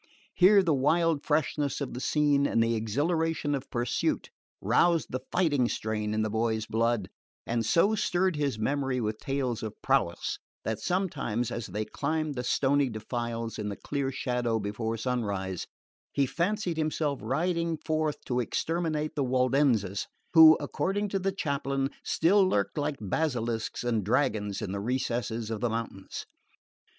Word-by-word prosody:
Here 195 +2 +6
the 165 -4 +2
wild 160 +3 +2
freshness 150 -1 0
of 140 -3 -4
the 125 - -5
scene 145 0 +2
and 115 - +2
the 115 0 +1
exhilaration 145 +7 0
of 135 -2 -3
pursuit 120 -1 -1 0.3
roused 160 - +2
the 130 - -2
fighting 145 -9 +2
strain 105 -1 -2
in 110 - +1
the 110 - -1
boy's 110 0 0
blood, 115 -3 0 0.4
and 115 -1 0
so 170 - +3
stirred 185 -3 +1
his 140 -6 -1
memory 135 +3 0
with 110 -2 -2
tales 130 -4 -2
of 110 -2 -6
prowess - - +1 0.2
that 110 -1 -2
sometimes, 125 - -1
as 115 - -4
they 105 +4 -3
climbed 155 +6 -2
the 125 -2 -4
stony 140 +2 +2
defiles 115 +1 -4
in 105 -1 -2
the 100 - -4
clear 140 +2 -2
shadow 125 -3 -1
before 110 +2 -3
sunrise, 100 -6 -2 0.4
he 140 - +2
fancied 175 - -1
himself 155 -2 0
riding 165 - 0
forth 155 0 -2
to 125 -1 0
exterminate 155 +4 -1
the 145 - +1
Waldenses 125 -6 +2 0.3
who, 160 -1 +9
according 205 +2 -1
to 195 - -1
the 195 +1 0
chaplain, 140 -6 -1
still 195 +5 +4
lurked 100 - +1
like 145 -1 -1
basilisks 115 -1 -2
and 115 -4 0
dragons 105 -3 0
in - - -3
the 100 - -3
recesses 120 -2 -2
of 110 - -2
the 120 - +1
mountains. 115 -4 -5
130 Hz, 155 wpm, -28 LUFS, 115-155 Hz, 0.4 s, who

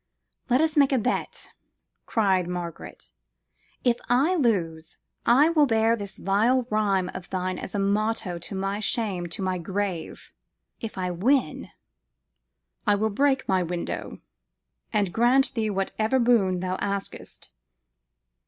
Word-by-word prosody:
"Let 255 +3 +4
us 320 0 +1
make 280 -2 +4
a 265 - +3
bet," 250 +2 -2 0.6
cried 190 -5 +2
Margaret: 175 -2 -7 0.7
"if 240 -2 +3
I 270 +9 +3
lose, 170 - -1 0.3
I 280 +7 +6
will 305 -3 +4
bear 225 -1 +3
this 200 -3 -5
vile 230 +6 +2
rhyme 200 -4 +1
of 180 - -8
thine 185 0 -2
as 190 - -7
a - - +1
motto 205 -2 0
to 185 - -6
my 195 +2 -2
shame 205 -5 -1
to 170 +3 -5
my 185 -1 -1
grave; 185 -1 -4 0.5
if 225 -3 -6
I 180 -1 -1
win 220 - 0 1.2
""I 205 - +5
will 215 +2 0
break 270 +4 +1
my 190 -1 +2
window, 175 0 -4 0.7
and 205 -5 0
grant 250 +4 +3
thee 225 -4 -1
whatever 215 +5 0
boon 220 -7 +3
thou 185 0 -2
askest." 200 - -5
205 Hz, 135 wpm, -25 LUFS, 185-240 Hz, 1.2 s, I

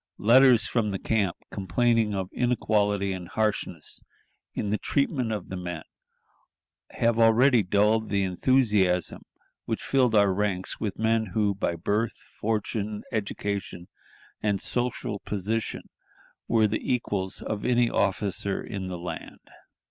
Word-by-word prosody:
Letters 120 +2 +6
from 115 -3 0
the 100 - -2
camp, 100 -4 0
complaining 105 +3 +1
of 95 -1 -3
inequality 105 -5 +1
and 90 -2 -6
harshness 105 -6 -2 0.5
in 100 - -2
the 105 - 0
treatment 135 -4 0
of 105 - -4
the 95 - -4
men, 90 -3 -5 1.1
have 115 0 +1
already 115 +2 +5
dulled 105 +3 +2
the 100 -1 +1
enthusiasm 95 -3 +2 0.4
which - - -3
filled 125 -4 +2
our 100 -2 +5
ranks 95 -2 -2
with 105 -3 -3
men 110 0 +1
who 105 -2 +2
by 90 -3 -1
birth, 105 +7 -1
fortune, 105 -1 -3
education, 100 -4 -3 0.5
and 100 -2 0
social 120 -2 -2
position 105 +3 -3 0.6
were 110 -1 +3
the 105 +1 -1
equals 100 -6 -2
of 105 -1 -4
any 120 -1 +3
officer 100 -1 0
in 95 -2 -5
the 90 -1 -4
land. 85 0 -8
105 Hz, 130 wpm, -26 LUFS, 95-115 Hz, 1.1 s, Letters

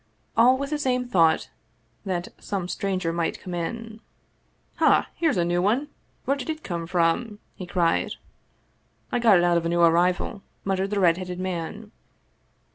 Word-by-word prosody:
All 245 +3 +5
with 280 +2 -4
the 300 - -1
same 250 -3 0
thought 165 -8 +3 0.5
that 180 -2 -2
some 195 -4 -3
stranger 185 -3 -2
might 170 -1 -1
come 180 - -7
in. 220 +6 -5 0.4
" - - -41
Ha! - - +4
here's 320 - +1
a 170 - +2
new 175 +1 +1
one! 240 +10 +1 0.4
Where 275 - +2
did 280 +2 -7
it 315 -1 -4
come 170 -2 -4
from? 180 +5 +1
" - - -41
he 185 - -8
cried. 170 -2 +1 0.5
" - - -41
I 245 - +1
got 225 -5 +6
it 175 - +3
out 175 -1 +3
of 170 - -1
a - - -1
new 170 0 +1
arrival," 175 +4 +2 0.2
muttered 195 0 0
the 205 0 -1
red 170 -3 +4
headed 180 -1 -5
man. 185 +4 -4
185 Hz, 185 wpm, -25 LUFS, 175-230 Hz, 0.5 s, got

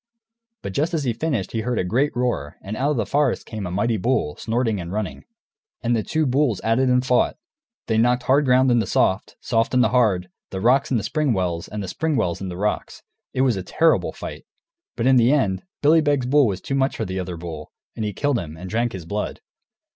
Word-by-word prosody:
But 100 - -5
just 160 - 0
as 155 - -1
he 125 -3 0
finished 120 - -2
he 115 - -2
heard 120 +1 -2
a - - +1
great 125 +11 0
roar, 120 - -2
and 105 +3 -5
out 135 +5 0
of 150 - 0
the 115 - 0
forest 140 +4 +1
came 105 -4 -5
a - - -5
mighty 110 +5 0
bull, 105 - 0
snorting 115 -3 -1
and 85 0 -7
running. 105 -1 -4 0.6
And 120 0 +2
the 110 - +1
two 155 +7 0
bulls 130 -5 +1
at 115 +2 +1
it 130 -1 +3
and 125 0 +2
fought. 125 -2 +2 0.5
They 110 -1 +1
knocked 125 +2 +3
the - - -16
hard 140 +3 +4
ground 130 0 +4
into 115 -4 +2
soft, 95 +2 +1
the - - -17
soft 115 +1 +1
into 125 0 +4
hard, 105 -8 +2 0.2
the 95 - -5
rocks 125 +7 +3
into 115 -6 0
spring 150 +3 0
wells, 90 -4 -2
and 105 -1 -5
the - - -5
spring 160 - -1
wells 90 -7 -1
into 90 -2 -5
rocks. 105 +2 -2 0.3
It 130 - -1
was 130 -4 +3
a 95 - -3
terrible 160 - +2
fight. - - -8 0.5
But 115 - -2
in 130 0 +5
the 120 +1 +5
end, 105 -11 +1 0.2
Billy 160 +3 +6
Beg's 145 -4 +1
bull 140 +1 +4
was 95 -3 -3
too - - -4
much 135 0 +1
for - - -2
the 95 +1 -3
other 90 -1 -4
bull, 80 -3 -7 0.2
and 110 - -3
he 105 - -1
killed 140 +5 0
him, 80 -3 -7
and 90 +2 -8
drank 115 +1 0
his 90 -4 -7
blood. 105 +5 -3
115 Hz, 240 wpm, -22 LUFS, 95-130 Hz, 0.6 s, Billy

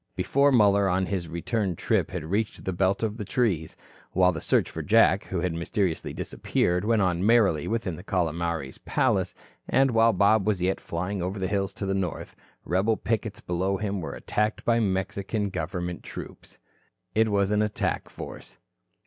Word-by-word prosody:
Before 140 +1 +3
Muller 100 -5 +4
on 95 +1 +1
his 90 -3 -3
return 90 +3 -2
trip - - 0
had - - -4
reached 100 +7 -2
the 95 - -1
belt 95 +4 +1
of 110 0 -2
trees, 95 -8 -1 0.4
while 90 0 +4
the 80 -3 -5
search - - +2
for - - -5
Jack, - - +4
who - - -3
had 90 -2 -1
mysteriously 85 +1 -1
disappeared, 90 +1 -1
went 110 -1 +2
on 90 -1 0
merrily 100 -9 +3
within 110 -6 -2
the 90 - -10
Calomares 85 -5 -2
palace, - - 0 0.3
and 135 0 +4
while 115 0 +5
Bob 100 +1 +3
was 105 -4 +2
yet 90 +2 0
flying 90 +3 -3
over 95 +4 -3
the 95 -1 -1
hills 95 0 -1
to 100 - -4
the 95 - 0
north, 95 -4 -3 0.3
rebel 100 +5 +1
pickets 110 -2 -2
below 95 +3 -1
him 100 -1 -2
were 80 - -5
attacked 105 +1 -1
by 115 0 +3
Mexican 100 0 -1
government 90 +1 -4
troops. - - -10 0.6
It 110 0 +3
was 100 -1 +1
an 105 0 +3
attack 105 -1 -1
in - - -18
force. - - -9
95 Hz, 175 wpm, -26 LUFS, 90-105 Hz, 0.6 s, while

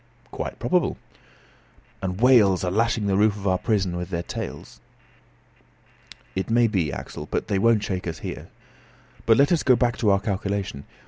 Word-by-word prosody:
"Quite - - -5
probable." - - 0 1.0
"And 95 0 -3
whales 110 -8 +5
are 90 - -1
lashing 110 +1 +1
the 100 -1 +1
roof 105 +1 +3
of 100 -1 -9
our 95 -1 +2
prison 100 -6 0
with 90 0 -5
their 85 -2 -3
tails?" - - -7 1.5
"It 95 +3 -3
may 120 +1 +4
be, 95 -10 0
Axel, - - -7
but - - -3
they 100 - +1
won't 115 0 +3
shake 90 -2 -3
us 80 - -4
here. - - -7 0.8
But 115 -1 +6
let 140 +3 +4
us 170 - +3
go 130 - +4
back 120 0 0
to 110 - +1
our 100 0 +4
calculation. 100 - -3
100 Hz, 175 wpm, -24 LUFS, 95-115 Hz, 1.5 s, But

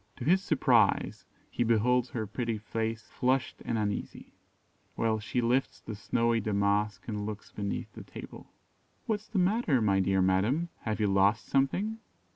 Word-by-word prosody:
To 120 - -7
his 185 +5 +4
surprise, 130 - +2 0.2
he - - 0
beholds 120 +2 +2
her 110 -3 -3
pretty 115 +2 -3
face 110 +1 -3
flushed 130 +1 -1
and 115 - -1
uneasy, 105 -2 -4 0.6
while 110 -1 +1
she 120 +3 -1
lifts 125 +3 0
the 110 - -7
snowy 115 +2 +1
damask 105 0 0
and 105 -3 -3
looks 105 -1 -7
beneath 100 -1 -4
the - - -9
table. - - -10 0.6
"What 215 -2 0
is 215 - -21
the 215 - -4
matter, 185 - +2
my 100 -3 +2
dear 95 0 +2
madam? 105 - +1 0.2
Have 110 -1 -1
you 105 - +2
lost 100 +2 +3
something?" 190 +12 0
115 Hz, 160 wpm, -30 LUFS, 105-130 Hz, 0.6 s, his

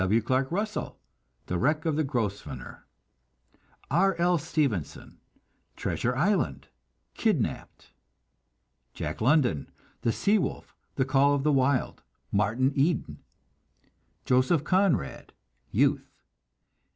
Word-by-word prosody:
W. 100 +4 +3
Clark 130 +4 0
Russell: 210 +4 -3 0.5
The 90 - -2
Wreck 150 - +1
of 160 -2 +1
the 155 - +1
Grosvenor. 100 - -4 1.0
R. 195 +5 +3
L. 175 0 +2
Stevenson: 140 - -2 0.6
Treasure 125 +1 -1
Island, 135 - 0 0.4
Kidnapped. - - -2 1.0
Jack 75 +6 -5
London: 125 - +2 0.3
The 115 - +1
Sea 205 - +2
Wolf, - - -4 0.2
The 130 - +1
Call 140 +2 +3
of 140 - -2
the 150 - +3
Wild, 130 -1 +1 0.3
Martin 110 +7 +1
Eden. 145 +2 0 1.1
Joseph 130 +5 +3
Conrad: 180 - 0 0.4
Youth. - - +1
135 Hz, 105 wpm, -27 LUFS, 110-160 Hz, 1.1 s, W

